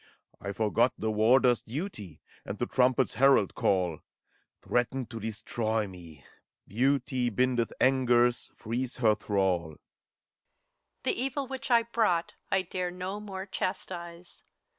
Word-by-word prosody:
I 100 - -4
forgot 110 +4 +2
the 110 0 -1
warder's 120 +3 +4
duty 115 - -6 0.2
And 100 - -6
the 120 - -1
trumpet's 130 0 +2
herald 135 -8 +5
call: 90 -5 +1 0.6
Threaten 125 +1 -1
to 115 -1 -8
destroy 110 0 -1
me! 85 -6 -13 0.4
Beauty 130 +2 +1
Bindeth 120 +1 +1
angers, 125 -2 +3
frees 120 +3 -3
her 115 -4 +4
thrall. 95 -4 +1
HELENA. 80 -2 -11 1.3
The - - +2
Evil 270 +1 -2
which 265 0 -6
I 235 -2 +5
brought, 220 -7 0 0.2
I 190 -1 +2
dare 180 0 -3
no 185 +3 -5
more 195 -2 -6
Chastise. 175 -2 -5
125 Hz, 125 wpm, -29 LUFS, 110-175 Hz, 1.3 s, herald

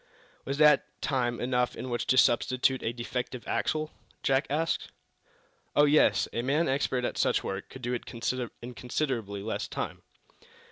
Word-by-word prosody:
"Was 140 +1 -2
that 150 0 +4
time 120 -4 0
enough 125 0 0
in 130 - -6
which 120 - -2
to 130 - +3
substitute 130 +2 +3
a 115 - -1
defective 125 +1 -4
axle?" 155 0 -1 0.3
Jack 135 +1 +2
asked. 160 +3 0 0.9
"Oh, 145 - +6
yes; 150 +1 +4
a 115 - 0
man 145 +7 +1
expert 130 -2 0
at - - -3
such - - +2
work 95 0 -4
could 130 - -11
do 120 +1 -1
it 120 - -2 0.6
in 125 +1 -6
considerably 120 -6 -2
less 110 - -3
time." - - -4
130 Hz, 155 wpm, -29 LUFS, 120-140 Hz, 0.9 s, Oh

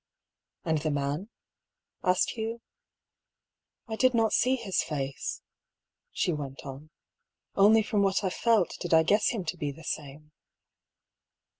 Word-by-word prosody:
" - - -61
And 160 -2 +1
the 155 - -1
man? 145 +7 -2 0.4
" - - -62 0.3
asked 180 -1 +2
Hugh. 225 +1 -4 0.6
" - - -60
I 220 - -3
did 255 +2 +3
not 225 -1 +2
see 255 +2 +3
his 220 -7 -1
face," 140 -3 -4 0.7
she 175 - 0
went 140 -2 -6
on. 140 +3 -9 0.3
" - - -62 0.3
Only 215 +3 +6
from 210 -1 0
what 195 0 +2
I 190 - 0
felt 220 -3 +2
did 170 -2 +1
I 160 - +6
guess 205 +6 +3
him 210 -7 -3
to - - -3
be 145 -1 -2
the 160 +4 -13
same." 150 +1 -6
180 Hz, 160 wpm, -28 LUFS, 150-220 Hz, 0.7 s, Only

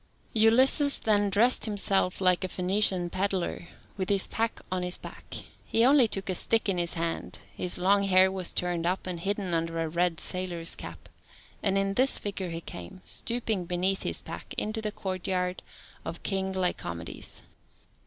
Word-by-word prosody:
Ulysses 260 +6 +5
then 205 -2 +2
dressed 225 +6 +3
himself 195 -3 0
like 185 -1 +3
a - - 0
Phoenician 185 -1 +4
pedlar, 185 -2 -2 0.3
with 190 -2 -2
his 200 -2 +5
pack 230 0 -2
on 185 -1 -1
his 180 0 -1
back: - - -9 0.3
he 230 +1 +2
only 270 -2 +6
took 195 -3 -4
a 185 - 0
stick 225 +5 +1
in 190 -3 0
his 170 0 0
hand, 165 0 -2 0.2
his 180 - +4
long 195 +3 +3
hair 190 0 +5
was 185 -2 -3
turned 175 -1 -1
up, 185 +2 -1
and 180 -2 -4
hidden 195 0 -2
under 165 0 -1
a 165 - -1
red 170 +1 0
sailor's 175 -2 -2
cap, - - -9 0.5
and 195 -1 +2
in 195 0 0
this 260 +5 +4
figure 195 -3 -4
he 165 0 -5
came, 90 - -9
stooping 230 -6 -1
beneath 180 +2 -1
his - - -2
pack, - - -8
into 215 +1 -1
the 215 -1 -2
courtyard 185 -1 -3 0.4
of - - -7
King 190 -1 -1
Lycomedes. 175 - -4
190 Hz, 170 wpm, -28 LUFS, 180-205 Hz, 0.5 s, only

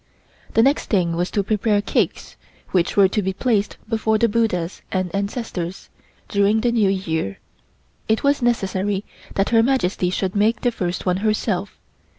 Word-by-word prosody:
The 225 - +6
next 275 +4 +2
thing 175 -5 +1
was 175 +2 -1
to 200 - 0
prepare 210 +1 +1
cakes, 205 - -1 0.4
which 180 0 +1
were 200 -1 +7
to 210 - 0
be 190 0 -1
placed 210 -1 0
before 220 -1 +1
the 230 - +3
Buddhas 205 -6 -1
and 185 -2 -1
ancestors, 200 -3 -4 0.4
during 205 +2 +2
the 240 - +2
New 220 -4 +3
Year. 160 - -2 0.7
It 220 0 +1
was 280 0 +2
necessary 200 -4 0 0.3
that 195 0 +1
Her 225 -1 +5
Majesty 225 -8 +1
should 185 +1 -2
make 220 +3 +2
the 245 - +2
first 180 -5 -3
one 180 -1 +1
herself. 205 -2 -1
205 Hz, 160 wpm, -21 LUFS, 185-225 Hz, 0.7 s, were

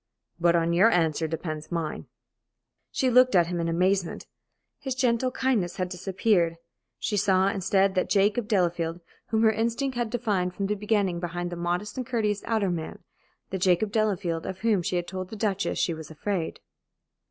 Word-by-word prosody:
"But 170 0 +4
on 170 0 +2
your 190 +7 +6
answer 160 -4 +1
depends 155 -1 -5
mine." 165 -3 -3 0.8
She 260 -1 0
looked 255 -2 +5
at 175 -2 +6
him 175 +1 -3
in 170 - -1
amazement. 185 +2 0 0.5
His 265 -3 -3
gentle 255 -1 +1
kindness 225 -10 0
had 185 -2 -2
disappeared. 180 -1 +1 0.4
She 210 - -2
saw, 190 -1 +3
instead, 195 0 +2
that 185 - 0
Jacob 205 +3 +2
Delafield 175 -5 0 0.3
whom 220 0 +1
her 220 - +6
instinct 235 +5 -1
had 240 -2 -1
divined 205 -6 -1
from 200 - -2
the 205 - 0
beginning 205 -4 0
behind 175 0 -4
the - - -4
modest 175 +6 -2
and 255 -2 -3
courteous 215 -5 0
outer 215 -5 +1
man, 160 -2 -5 0.5
the 190 - -2
Jacob 185 +3 +2
Delafield 200 -6 0
of 190 0 -6
whom 215 -4 +2
she 175 - -2
had 175 -1 -1
told 185 -1 -5
the 220 - -7
Duchess 200 -2 -1
she 170 - +1
was 160 -1 -8
afraid. 170 +2 -3
190 Hz, 175 wpm, -26 LUFS, 175-215 Hz, 0.8 s, your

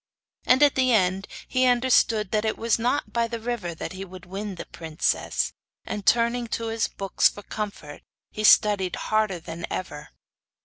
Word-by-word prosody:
And 260 +3 +5
at 290 - +5
the 255 -1 +2
end 190 -3 +2 0.2
he 255 0 +2
understood 240 -4 +3
that 215 -1 +1
it 220 - -1
was 230 0 +1
not 245 +5 -1
by 235 -1 +1
the 230 0 -5
river 220 -7 -4
that 160 - -6
he 190 +1 -6
would 185 -1 -11
win 195 +2 -5
the - - -7
princess; 160 -1 -2 0.3
and, 205 -2 -5
turning 235 +1 +3
to 230 0 -3
his 225 0 0
books 195 -1 +1
for 205 - -11
comfort, 200 -10 -6 0.3
he 215 - -5
studied 205 -4 +5
harder 215 -4 0
than 165 +1 -7
ever. 150 -5 -6
215 Hz, 175 wpm, -25 LUFS, 185-235 Hz, 0.3 s, And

